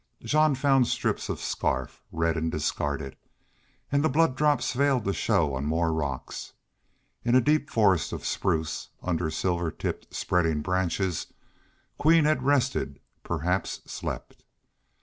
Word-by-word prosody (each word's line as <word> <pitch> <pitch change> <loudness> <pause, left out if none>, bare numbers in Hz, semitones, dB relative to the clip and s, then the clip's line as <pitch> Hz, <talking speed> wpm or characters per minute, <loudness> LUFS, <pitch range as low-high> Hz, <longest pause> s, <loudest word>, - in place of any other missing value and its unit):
Jean 155 -1 +3
found 135 -2 +3
strips - - -1
of - - -2
scarf, 65 -1 -2
red 80 0 0
and 80 0 -1
discarded. 70 -2 -2 0.8
And 140 +1 +2
the 155 - +3
blood 155 -1 +3
drops 145 -5 +2
failed 135 -3 +2
to 100 - +1
show 85 -11 +1
on 65 +2 -2
more 80 +1 +1
rocks. 70 -5 -4 0.7
In 120 +1 +2
a - - +8
deep 150 +3 +2
forest 100 - +3
of - - -6
spruce, 80 -1 -1
under 85 -2 0
silver 85 +1 -1
tipped - - -5
spreading 80 -4 +1
branches, 90 0 -1 0.7
Queen 160 +1 +5
had 155 -3 +2
rested, 130 - +1 0.2
perhaps 90 +3 -1
slept. - - -6
95 Hz, 135 wpm, -27 LUFS, -, 0.8 s, a